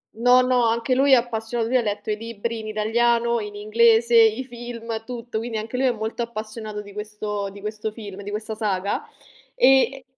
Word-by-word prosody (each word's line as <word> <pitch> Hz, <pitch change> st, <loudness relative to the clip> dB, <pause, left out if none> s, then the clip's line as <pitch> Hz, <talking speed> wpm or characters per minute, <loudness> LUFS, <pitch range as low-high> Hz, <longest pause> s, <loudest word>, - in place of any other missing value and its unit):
No, 245 Hz, +3 st, +5 dB
no, 250 Hz, -1 st, +2 dB
anche 230 Hz, +2 st, +1 dB
lui 270 Hz, +2 st, +4 dB
è -, -, +11 dB
appassiona 235 Hz, -1 st, -1 dB
lui 240 Hz, +3 st, -1 dB
ha 255 Hz, -, +5 dB
letto 210 Hz, -1 st, -3 dB
i 210 Hz, -, -1 dB
libri 230 Hz, +1 st, -4 dB
in 215 Hz, -, -7 dB
italiano, 235 Hz, +2 st, +1 dB
in 210 Hz, -1 st, -6 dB
inglese, 225 Hz, +2 st, +3 dB
i 225 Hz, +2 st, +5 dB
film, 235 Hz, -2 st, -6 dB
tutto, 240 Hz, -2 st, -5 dB
quindi 230 Hz, -1 st, -4 dB
anche 220 Hz, +3 st, -5 dB
lui 260 Hz, +1 st, +2 dB
è -, -, +3 dB
molto 220 Hz, +1 st, -4 dB
appassionato 215 Hz, -2 st, -5 dB
di 205 Hz, -1 st, -13 dB
questo 210 Hz, -1 st, -4 dB
di 200 Hz, +1 st, -12 dB
questo 215 Hz, +1 st, -4 dB
film, 205 Hz, -3 st, -9 dB
di 200 Hz, -, -7 dB
questa 215 Hz, +1 st, -4 dB
saga, 200 Hz, -3 st, -1 dB, 0.5 s
e 270 Hz, -, +4 dB
225 Hz, 195 wpm, -23 LUFS, 215-240 Hz, 0.5 s, è